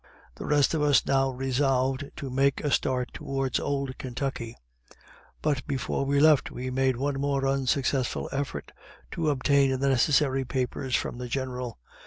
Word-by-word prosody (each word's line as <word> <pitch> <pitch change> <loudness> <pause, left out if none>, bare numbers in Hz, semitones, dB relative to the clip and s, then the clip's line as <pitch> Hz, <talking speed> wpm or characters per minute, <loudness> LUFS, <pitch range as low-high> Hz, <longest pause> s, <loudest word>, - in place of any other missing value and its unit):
The - - -8
rest 145 0 +3
of 160 - 0
us 145 -1 +4
now 135 0 +2
resolved 135 +1 0
to 135 -4 -6
make 135 +1 +2
a 145 - 0
start 125 -2 0
towards 135 -2 -2
old 140 -2 -2
Kentucky; 125 -2 -4 0.9
but 145 -3 0
before 140 -1 -1
we 140 +1 +2
left 155 -1 +5
we 130 +1 -5
made 130 -1 +1
one 135 +1 -1
more 140 -1 0
unsuccessful 135 -1 0
effort 135 - -4 0.4
to 160 -2 0
obtain 140 -1 +2
the 140 0 +2
necessary 135 0 +3
papers 130 0 -2
from 120 - -2
the 125 - -4
General. 125 - -4
135 Hz, 155 wpm, -27 LUFS, 130-140 Hz, 0.9 s, left